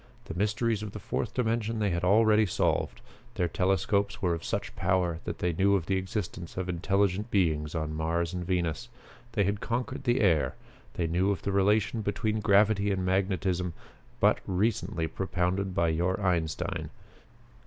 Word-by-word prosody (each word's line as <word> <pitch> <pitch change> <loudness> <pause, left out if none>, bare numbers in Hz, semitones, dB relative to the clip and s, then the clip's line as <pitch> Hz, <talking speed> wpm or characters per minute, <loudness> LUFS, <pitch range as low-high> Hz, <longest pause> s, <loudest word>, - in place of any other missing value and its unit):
The - - -6
mysteries 105 +4 0
of 105 -2 -6
the - - -6
Fourth - - -3
Dimension 115 -2 0
they 105 -3 +1
had 85 0 -1
already 110 +2 +5
solved. 85 - 0 0.3
Their 90 -5 +1
telescopes 95 +3 +1
were 90 -3 +1
of 85 0 -4
such - - -3
power 90 -2 +1
that - - -4
they 90 -1 0
knew 100 +4 +3
of 90 -5 -1
the 95 - 0
existence 95 -2 -4
of 95 0 -2
intelligent 95 +4 0
beings 80 -6 +1
on 80 -1 -2
Mars 85 +2 -1
and 90 -1 -3
Venus. 90 +5 -1 0.4
They 105 - +2
had 100 +1 0
conquered 125 +3 -3
the 120 -1 +2
air. 85 -8 +3 0.4
They 85 - 0
knew 90 +4 +1
of 100 - -1
the 100 - -1
relation 105 +3 +2
between 105 +1 -1
gravity 105 0 +3
and 95 -1 -1
magnetism 95 -2 0 0.5
but - - +4
recently 95 -2 0
propounded 95 +2 -1
by 85 -1 +2
your 90 +4 0
Einstein. 85 -5 -1
95 Hz, 165 wpm, -29 LUFS, 85-105 Hz, 0.5 s, already